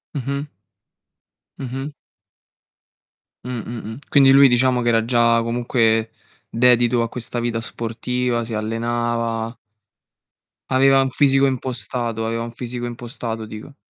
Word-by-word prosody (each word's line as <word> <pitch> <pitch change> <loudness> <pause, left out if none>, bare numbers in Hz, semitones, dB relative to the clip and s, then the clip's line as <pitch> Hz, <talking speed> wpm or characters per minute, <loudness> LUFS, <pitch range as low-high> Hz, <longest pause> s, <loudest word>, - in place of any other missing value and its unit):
Mh-mh. 140 +1 -3 1.1
Mh-mh. 135 +2 -5 1.5
Mh, 125 -2 -4
mh, - - -8 0.2
mh, 115 +4 -8
quindi 135 -2 +6
lui 140 0 +8
diciamo 125 0 +2
che 120 - -2
era 115 -1 +2
già 115 -1 +3
comunque 115 -1 +1 0.4
dedito 120 0 +3
a 115 - -3
questa 120 0 -5
vita 115 -1 -2
sportiva, 120 +1 -2
si 115 -1 -5
allenava 115 +1 -2 1.1
aveva 135 +1 +4
un 135 - 0
fisico 135 0 +3
impostato, 120 -3 -2
aveva 115 +1 -2
un 115 - -6
fisico 120 0 -5
impostato 120 -2 -6
dico. 110 +6 -10
120 Hz, 120 wpm, -21 LUFS, 115-130 Hz, 1.5 s, lui